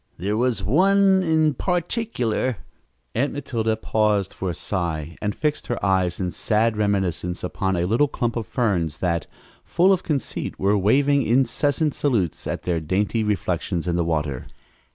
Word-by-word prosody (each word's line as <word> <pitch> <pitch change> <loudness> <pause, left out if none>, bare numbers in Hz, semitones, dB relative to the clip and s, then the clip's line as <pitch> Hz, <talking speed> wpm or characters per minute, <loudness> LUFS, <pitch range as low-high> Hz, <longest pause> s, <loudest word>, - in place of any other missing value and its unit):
There 100 +5 -1
was 120 -3 0
one 190 - +4
in 160 -3 +2
particular 165 - -1 0.3
" 65 -3 -46
Aunt 135 +5 0
Matilda 115 -6 -1
paused 105 -3 0
for 95 - -3
a - - -2
sigh 85 -4 -3
and 105 -1 -2
fixed 150 -1 -2
her 120 - -1
eyes 95 -2 +1
in 90 -2 -1
sad 110 +3 +1
reminiscence 95 -4 -1
upon 95 +1 -1
a 85 0 0
little 115 +10 +3
clump 120 -4 -2
of 115 -3 -3
ferns 90 - 0
that, 85 -2 -1 0.4
full 185 +3 +3
of 185 - 0
conceit, 150 -7 -3
were 100 +2 +2
waving 140 +8 +3
incessant 135 +5 +1
salutes 110 - -1
at - - -3
their 85 -2 0
dainty 100 +7 0
reflections 90 -3 -1
in 85 - 0
the 85 - +1
water. 75 -5 -2
105 Hz, 160 wpm, -23 LUFS, 90-140 Hz, 0.4 s, one